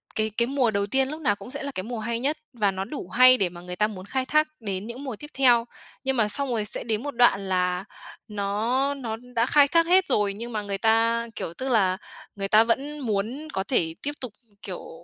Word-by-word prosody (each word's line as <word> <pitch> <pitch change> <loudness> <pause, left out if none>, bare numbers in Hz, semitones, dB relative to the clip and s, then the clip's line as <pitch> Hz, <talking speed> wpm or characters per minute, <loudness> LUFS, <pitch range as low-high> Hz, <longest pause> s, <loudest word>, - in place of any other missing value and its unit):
cái 215 0 0
cái 235 - +2
mùa 260 -4 +1
đầu 200 0 0
tiên 265 +4 +1
lúc 310 +2 -6
nào 205 -7 +2
cũng 245 - -11
sẽ 280 0 -6
là 280 - -4
cái 185 - -2
mùa 230 +1 -5
hay 230 +1 -2
nhất 285 +5 0 0.2
và 210 -4 +1
nó 190 0 -4
đủ 280 +6 -7
hay 255 +1 +7
để 190 -5 +1
mà 175 0 -11
người 180 0 -7
ta 210 +3 +2
muốn 190 -3 -8
khai 260 +5 -2
thác 305 +3 +3
đến 200 -1 -4
những 245 +4 -7
mùa 260 -5 -4
tiếp 295 - -10
theo. 245 -3 +4 0.4
Nhưng 265 -1 0
mà 215 - +3
xong 270 +6 0
rồi 220 -3 0
sẽ 210 - -2
đến 225 +1 -2
một 285 - -3
đoạn 200 -5 +3
là 180 +1 0 0.4
nó 220 +7 0
nó 245 -6 -4 0.2
đã 230 +1 +3
khai 285 0 +6
thác 335 +2 +3
hết 370 +2 +5
rồi, 205 -1 +2
nhưng 235 +4 -7
mà 215 - -1
người 200 -1 -3
ta, 230 +2 +2
kiểu, 165 - -5
tức 260 +8 -5
là 190 -6 +3 0.4
người 195 -1 -3
ta 215 +3 +6
vẫn 280 +6 -1
muốn 230 +5 -2
có 190 - -1
thể 165 -9 0
tiếp 290 - -1
tục, 250 -5 -4 0.3
kiểu, 175 -3 -8
230 Hz, 250 wpm, -25 LUFS, 200-265 Hz, 0.4 s, hay